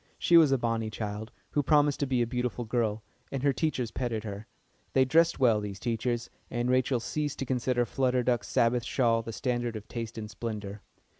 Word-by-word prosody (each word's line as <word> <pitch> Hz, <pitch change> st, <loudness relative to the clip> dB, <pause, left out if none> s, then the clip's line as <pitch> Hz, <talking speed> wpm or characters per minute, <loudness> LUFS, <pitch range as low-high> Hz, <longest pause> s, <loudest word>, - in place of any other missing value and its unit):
She 175 Hz, -, +3 dB
was 160 Hz, -4 st, +7 dB
a 135 Hz, -, +4 dB
bonny 115 Hz, -2 st, -1 dB
child, 110 Hz, +1 st, -5 dB, 0.2 s
who 145 Hz, -, +2 dB
promised 145 Hz, 0 st, +3 dB
to 140 Hz, -, 0 dB
be 125 Hz, -2 st, +2 dB
a -, -, 0 dB
beautiful 125 Hz, 0 st, -2 dB
girl, 110 Hz, -2 st, -1 dB, 0.3 s
and 135 Hz, -1 st, -3 dB
her 140 Hz, -1 st, +3 dB
teachers 130 Hz, -5 st, -1 dB
petted 115 Hz, -4 st, -2 dB
her. 105 Hz, 0 st, -7 dB, 0.5 s
They 130 Hz, -1 st, +5 dB
dressed 165 Hz, +5 st, +4 dB
well, 115 Hz, -5 st, +4 dB
these 100 Hz, -2 st, -6 dB
teachers, 120 Hz, 0 st, -1 dB, 0.2 s
and 120 Hz, +1 st, 0 dB
Rachel 130 Hz, 0 st, +2 dB
ceased 145 Hz, +4 st, -3 dB
to 135 Hz, -, -3 dB
consider 125 Hz, -1 st, +1 dB
Flutter 125 Hz, +1 st, +1 dB
Duck's 120 Hz, -4 st, 0 dB
Sabbath 120 Hz, +1 st, +2 dB
shawl 115 Hz, -2 st, +2 dB
the 115 Hz, -, -6 dB
standard 120 Hz, -1 st, -2 dB
of 105 Hz, -1 st, -7 dB
taste 115 Hz, -1 st, -6 dB
and 110 Hz, -1 st, -5 dB
splendour. 105 Hz, -2 st, -6 dB
120 Hz, 200 wpm, -29 LUFS, 110-130 Hz, 0.5 s, was